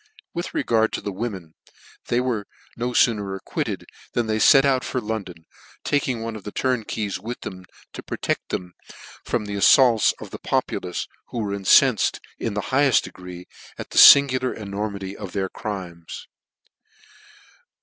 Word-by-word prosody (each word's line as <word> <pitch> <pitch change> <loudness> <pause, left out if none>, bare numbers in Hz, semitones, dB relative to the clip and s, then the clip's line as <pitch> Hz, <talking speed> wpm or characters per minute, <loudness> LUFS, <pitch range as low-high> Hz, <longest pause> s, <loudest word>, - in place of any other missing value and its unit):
With 175 +1 -5
regard 110 -1 +2
to - - -3
the 100 - -4
women, 95 -6 -6 0.5
they 120 - +1
were 120 -5 -2 0.3
no 120 +1 -2
fooner 105 -5 +1
Acquitted - - -4 0.3
than 120 - 0
they 110 0 -1
fet 135 +5 +6
out 130 -2 +2
for 130 - -2
London, 100 -7 -6 0.4
taking 130 -5 0
one 115 -1 -5
of 105 - -9
the 105 - -7
turnkeys 110 -6 -2
with 115 +5 -7
them, 95 -1 -8 0.3
to - - -7
protect - - -3
them 90 -1 -4 0.5
from 105 - -2
the 105 - -5
affaults 115 +3 +5
of - - -10
the - - -7
populace, 90 -1 -2 0.2
who - - -8
were 105 -3 -2
incenfed 95 -2 +4 0.2
in 110 -3 -3
the 105 - -1
higheft 140 -1 +4
degree 90 -1 -10 0.3
at - - -8
the - - +3
fingular 130 -2 +7
enormity 100 -1 -5
of 100 -4 -8
their 95 -2 -2
crimes. 90 -6 -7
105 Hz, 155 wpm, -23 LUFS, 95-120 Hz, 0.5 s, fingular